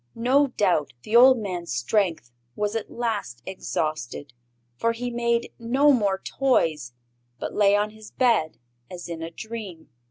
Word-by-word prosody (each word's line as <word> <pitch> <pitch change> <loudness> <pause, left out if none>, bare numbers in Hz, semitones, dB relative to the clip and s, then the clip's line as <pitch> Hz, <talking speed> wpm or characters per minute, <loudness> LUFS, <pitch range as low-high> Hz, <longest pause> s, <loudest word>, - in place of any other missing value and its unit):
No 265 +5 +3
doubt 185 - 0
the 215 - -2
old 255 +2 +8
man's 180 -6 -4
strength 155 - 0 0.2
was 210 +1 -2
at 225 - -3
last 205 - -3
exhausted, 155 -7 -4 0.4
for 230 - 0
he 245 +1 -4
made 235 0 0
no 265 +5 +4
more 200 -6 +1
toys, 160 - +1 0.4
but - - -5
lay 205 -1 +4
on 210 +1 0
his 215 0 -13
bed 225 - +1 0.3
as 175 -1 -8
in 165 -1 -6
a 165 - -4
dream. 205 -2 -8
210 Hz, 150 wpm, -25 LUFS, 165-235 Hz, 0.4 s, old